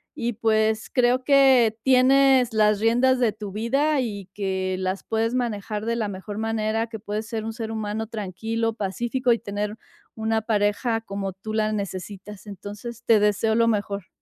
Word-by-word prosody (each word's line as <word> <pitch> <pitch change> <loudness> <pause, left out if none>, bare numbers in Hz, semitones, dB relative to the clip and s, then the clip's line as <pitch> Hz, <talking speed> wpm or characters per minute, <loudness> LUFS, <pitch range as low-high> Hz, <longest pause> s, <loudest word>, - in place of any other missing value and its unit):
Y, 240 0 -2
pues, 220 0 +1
creo 250 0 +2
que 265 -6 +5
tienes 265 -1 +5
las 210 -1 +3
riendas 245 +4 +3
de 225 -4 +2
tu 210 -2 -7
vida 275 +8 +1
y 200 -6 -5
que 190 -2 -2
las 185 +1 -2
puedes 225 +2 -1
manejar 215 -3 -2
de 230 0 0
la 220 -3 -1
mejor 200 +1 -7
manera, 225 0 -1
que 220 -1 -7
puedes 210 +1 -4
ser 225 -2 -4
un 225 - -4
ser 225 -1 -5
humano 220 0 -3
tranquilo, 225 +2 -3
pacífico 240 +5 -1
y 230 - +4
tener 205 0 -4 0.4
una 220 0 0
pareja 220 +2 0
como 195 -3 -5
tú 215 +3 -7
la 215 0 +1
necesitas, 200 0 -6
entonces, 205 +4 -8
te 225 -2 +5
deseo 210 +2 +2
lo 230 0 +3
mejor. 200 -3 -1
220 Hz, 170 wpm, -24 LUFS, 205-235 Hz, 0.4 s, que